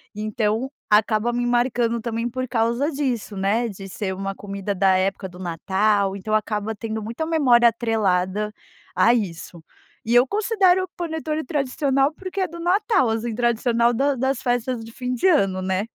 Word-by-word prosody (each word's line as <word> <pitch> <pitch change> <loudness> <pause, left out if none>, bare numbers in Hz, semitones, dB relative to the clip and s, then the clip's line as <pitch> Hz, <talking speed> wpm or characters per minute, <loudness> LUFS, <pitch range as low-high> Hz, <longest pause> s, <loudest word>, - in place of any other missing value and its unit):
Então 215 +4 -1 0.2
acaba 215 +2 +3
me 240 0 -1
marcando 240 -1 +1
também 230 +1 -2
por 255 +1 -4
causa 235 +5 0
disso, 250 -8 -3
né. 210 +5 +1
De 195 -1 -9
ser 190 0 -4
uma 195 +1 -4
comida 200 0 -4
da 190 -1 +3
época 190 0 -1
do 180 - -14
Natal. 195 +3 0
Então 200 +2 -4
acaba 215 0 -1
tendo 220 +1 -4
muita 230 +8 -4
memória 250 -7 +5
atrelada 210 -3 0 0.4
a 235 - +5
isso. 170 -6 -4 0.4
E 230 +2 +1
eu 245 +1 +7
considero 390 - +2
o - - -22
panetone 320 -2 -3
tradicional, 275 0 0
porque 380 +3 -5
é 375 - +1
do 340 +1 -10
Natal, 355 - +2
assim, 225 0 -2
tradicional 235 0 +2
da 275 +4 +1
das 265 +1 -1
festas 245 -1 -1
de 225 - -11
fim 250 +2 -4
de 250 +10 +1
ano, 195 - +2
né. 190 +2 -1
230 Hz, 170 wpm, -22 LUFS, 205-260 Hz, 0.4 s, eu